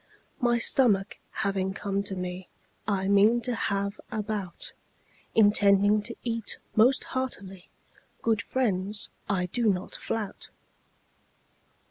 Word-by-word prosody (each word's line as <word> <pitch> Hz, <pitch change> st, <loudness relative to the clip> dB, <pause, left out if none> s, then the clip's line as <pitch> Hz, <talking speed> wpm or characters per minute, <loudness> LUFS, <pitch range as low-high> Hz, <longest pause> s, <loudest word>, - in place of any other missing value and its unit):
My 240 Hz, -3 st, +3 dB
stomach 220 Hz, -4 st, +2 dB
having 195 Hz, -2 st, -1 dB
come 200 Hz, -1 st, -1 dB
to 195 Hz, -, -4 dB
me, 180 Hz, 0 st, -5 dB, 0.4 s
I 195 Hz, -2 st, 0 dB
mean 205 Hz, +4 st, +5 dB
to 250 Hz, +1 st, +1 dB
have 200 Hz, -2 st, -1 dB
a 215 Hz, -, -2 dB
bout, 200 Hz, -5 st, -4 dB, 0.6 s
Intending 205 Hz, -1 st, +5 dB
to 235 Hz, +2 st, -6 dB
eat 230 Hz, -3 st, -2 dB, 0.2 s
most 245 Hz, +5 st, +5 dB
heartily; 195 Hz, -8 st, -4 dB, 0.5 s
Good 225 Hz, -2 st, +2 dB
friends, 205 Hz, -5 st, -1 dB, 0.2 s
I 185 Hz, -3 st, +1 dB
do 220 Hz, +4 st, +2 dB
not 185 Hz, -1 st, -4 dB
flout. 220 Hz, -3 st, -4 dB
205 Hz, 115 wpm, -28 LUFS, 195-225 Hz, 0.6 s, mean